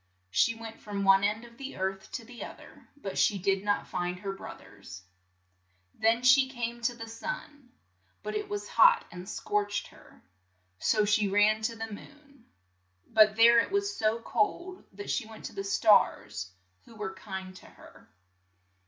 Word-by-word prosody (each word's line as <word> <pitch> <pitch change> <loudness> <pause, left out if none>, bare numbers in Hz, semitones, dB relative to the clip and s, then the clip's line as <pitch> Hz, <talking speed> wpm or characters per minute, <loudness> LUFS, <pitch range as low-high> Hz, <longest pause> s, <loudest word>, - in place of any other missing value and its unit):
She 230 - +3
went 225 0 -10
from 200 -1 -4
one 195 0 +5
end 210 +3 0
of 235 0 -17
the 275 0 -7
earth 190 0 -3
to 230 - -5
the 240 0 -9
oth - - -9
er, - - -16
but 200 -9 -5
she 205 - +3
did 195 +1 0
not 205 0 0
find 180 0 -3
her 195 +1 -4
broth 195 - -9
ers. 95 -1 -12 0.9
Then 225 +2 +2
she 260 +1 +6
came 240 -2 -4
to 235 +1 0
the 230 -1 -8
sun, 290 +2 -7 0.5
but - - -4
it 420 -1 -3
was 410 0 -4
hot - - +5
and 180 +2 -9
scorched 205 0 -2
her, - - -19 0.6
so 215 -2 +2
she 210 0 +2
ran 210 +2 +3
to 230 +1 -2
the 225 0 -6
moon. 280 +2 -15 0.6
But 215 -1 +5
there 235 +1 +7
it - - 0
was 400 +1 -1
so 220 +1 +1
cold 345 - -1
that 205 +1 -6
she 230 - -1
went 220 -1 -11
to - - -7
the 195 - -4
stars, 200 - +2 0.3
who 230 - -16
were 210 -3 -5
kind 190 -1 -8
to - - -15
her. - - -17
220 Hz, 180 wpm, -29 LUFS, 200-240 Hz, 0.9 s, there